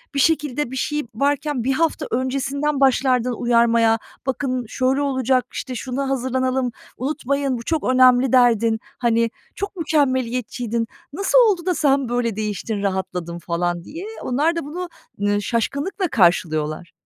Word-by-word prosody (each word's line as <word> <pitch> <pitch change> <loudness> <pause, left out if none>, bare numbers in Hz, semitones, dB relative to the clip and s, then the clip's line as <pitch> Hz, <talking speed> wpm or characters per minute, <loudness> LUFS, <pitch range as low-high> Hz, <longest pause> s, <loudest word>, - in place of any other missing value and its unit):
bir - - +1
şekilde, 295 -3 +1
bir - - -5
şey 295 +3 -1
varken 285 0 0
1 265 +3 +1
hafta 325 +3 0
öncesinden 275 +3 -1
başlardın 255 -2 +3
uyarmaya. 235 -1 +3 0.3
Bakın 255 -1 -1
şöyle 260 +4 0
olacak, 260 -2 +1
işte 255 -2 -5
şuna 265 +3 -3
hazırlanalım, 260 -1 0 0.3
unutmayın 280 -1 -1
bu 235 - -7
çok 320 +4 -1
önemli." 255 0 +5
derdin. 230 -3 +4 0.2
Hani, 230 -1 +2 0.3
"Çok 400 0 -4
mükemmeliyetçiydin. 250 - 0 0.3
Nasıl 395 +9 +2
oldu 350 -3 -4
da 365 -1 +1
sen 275 -4 +2
böyle 240 -3 0
değiştin, 210 0 -3
rahatladın?" 185 -3 -3
falan 175 +1 -2
diye. 330 - -8 0.2
Onlar 295 +7 +1
da 335 - -2
bunu, 350 +5 -5 0.3
ııı, 205 0 +1
şaşkınlıkla 280 - -1
karşılıyorlar. 170 - +1
255 Hz, 135 wpm, -21 LUFS, 230-280 Hz, 0.3 s, önemli